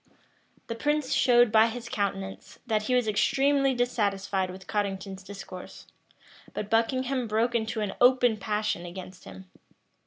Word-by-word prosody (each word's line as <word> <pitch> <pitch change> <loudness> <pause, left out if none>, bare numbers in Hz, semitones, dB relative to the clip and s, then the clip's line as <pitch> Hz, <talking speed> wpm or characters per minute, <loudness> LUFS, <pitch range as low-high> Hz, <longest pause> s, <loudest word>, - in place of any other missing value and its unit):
The - - -4
prince 295 +3 0
showed 240 -2 +5
by 220 0 +6
his 235 +1 -6
countenance, 195 -3 -4
that 220 -3 +1
he 250 +4 0
was 245 -3 +2
extremely 275 +5 +2
dissatisfied 200 -6 0
with 185 0 -10
Cottington's 195 -2 -3
discourse; 190 -2 -10 0.7
but 210 - -4
Buckingham 255 +2 +1
broke 225 +3 +1
into 220 -1 -1
an 205 -2 -2
open 245 -2 +5
passion 210 -3 -2
against 180 +1 -9
him. 190 - -11
220 Hz, 135 wpm, -27 LUFS, 195-245 Hz, 0.7 s, by